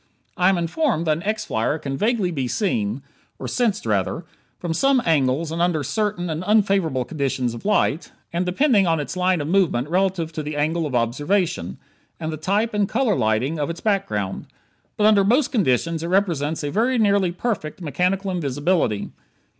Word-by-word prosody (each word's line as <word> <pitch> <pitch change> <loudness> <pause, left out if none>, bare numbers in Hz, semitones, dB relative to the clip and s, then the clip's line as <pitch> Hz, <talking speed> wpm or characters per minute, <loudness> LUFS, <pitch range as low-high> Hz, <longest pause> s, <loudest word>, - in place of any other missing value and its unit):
I 185 -2 +3
am 195 - +2
informed 170 - 0
that 155 -1 +2
an - - -7
X 215 +3 -2
flyer 115 +7 0
can 140 -3 -4
vaguely 210 - +1
be 135 -6 -2
seen 120 - -1 0.3
or - - -6
sensed, 225 -5 0
rather 105 - -1 0.3
from 175 -2 -3
some 270 +9 +3
angles 150 0 +1
and 165 +1 -2
under 175 -4 +1
certain 180 - -1
and 160 +1 -3
unfavorable 195 - +2
conditions 135 -5 -2
of 120 - -9
light, 190 -6 +1 0.2
and 170 +1 0
depending 200 +2 +3
on 165 -1 +2
its 145 +3 -4
line 180 -2 +1
of 145 - -4
movement 165 -8 +2
relative 180 -2 0
to 155 - -3
the 150 0 -5
angle 160 +2 0
of 135 - -4
observation, 125 - 0 0.4
and 160 0 -3
the - - -4
type 205 +8 0
and 205 -2 +1
color 240 -2 +1
lighting 115 +9 0
of 145 - -1
its 170 - -5
background. 110 - -1 0.5
But 210 - +2
under 210 -2 +5
most 245 +8 +2
conditions 165 - +1
it 165 - -3
represents 165 -5 0
a 145 - -2
very 240 - +1
nearly 200 -4 +3
perfect 180 -5 -3
mechanical 185 +4 -1
invisibility. 145 - 0
170 Hz, 180 wpm, -22 LUFS, 145-200 Hz, 0.5 s, under